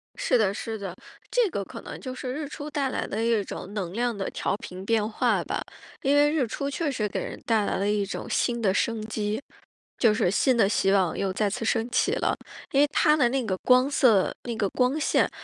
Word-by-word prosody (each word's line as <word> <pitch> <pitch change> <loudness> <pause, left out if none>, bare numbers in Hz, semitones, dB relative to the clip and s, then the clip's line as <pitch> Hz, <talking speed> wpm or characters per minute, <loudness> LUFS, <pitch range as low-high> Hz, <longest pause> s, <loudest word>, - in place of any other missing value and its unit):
是 - - +2
的 205 -4 +2
是 225 0 -4
的。 195 -4 -6 0.3
这 485 -5 +2
个 200 - -3
可 - - -9
能 - - -8
就 255 -1 -6
是 255 0 -4
日 295 +1 -4
出 290 +1 -7
带 285 -3 -1
来 - - -2
的 220 +3 -2
一 230 -3 +2
种 195 +1 -7
能 185 -4 -3
量 240 +1 0
的 195 - -2
调 - - -1
频 185 -2 -8
变 220 -1 +2
化 220 - +1
吧。 - - -3 0.4
因 275 +1 +2
为 290 0 +5
日 295 -6 +1
出 280 +5 -3
确 290 +2 -1
实 215 -5 -1
给 - - -3
人 - - -6
带 220 -3 +2
来 - - -1
了 200 +1 0
一 205 -1 +1
种 195 - -5
新 235 -1 0
的 195 -4 +2
生 220 +1 0
机， 215 +1 -2 0.6
就 225 -4 +4
是 180 -4 +1
新 255 +6 +3
的 220 - +5
希 195 -2 +2
望 190 -4 +2
又 195 -1 0
再 205 +1 +1
次 225 - -4
升 225 +1 0
起 - - +2
了。 - - +1 0.4
因 275 - +4
为 295 - +5
它 300 -2 +4
的 245 -5 +4
那 265 +1 0
个 190 -3 0
光 255 +2 +5
色， 230 -9 +4
那 240 -2 -4
个 210 -2 0
光 255 +7 +1
线， 310 - +2
230 Hz, 255 characters per minute, -26 LUFS, 205-265 Hz, 0.6 s, 为